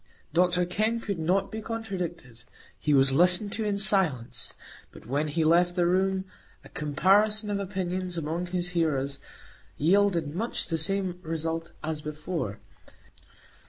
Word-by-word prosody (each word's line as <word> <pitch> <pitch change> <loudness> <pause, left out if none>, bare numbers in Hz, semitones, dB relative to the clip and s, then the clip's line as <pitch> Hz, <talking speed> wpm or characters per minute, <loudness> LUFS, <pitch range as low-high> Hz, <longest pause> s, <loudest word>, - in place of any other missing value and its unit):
Dr 180 +1 +3
Kenn 215 +6 0
could 200 -6 -4
not 185 +5 +1
be 220 0 -5
contradicted; 180 - -5 0.4
he 150 - -1
was 135 -1 +5
listened 180 +6 +5
to 220 - -2
in 205 -1 0
silence; 190 - +1 0.4
but - - -14
when 145 +6 -1
he 160 +2 0
left 175 +2 +3
the 175 -2 +2
room, 190 +1 +1 0.4
a - - -14
comparison 205 +8 +2
of 200 - -1
opinions 185 -2 -3
among 165 +3 -3
his 180 0 -2
hearers 145 -6 -1 0.6
yielded 170 -2 +2
much 225 +6 -1
the 165 -2 -2
same 190 +1 +1
result 165 0 -3
as 155 -1 -3
before. 150 - -4
175 Hz, 140 wpm, -27 LUFS, 155-195 Hz, 0.6 s, was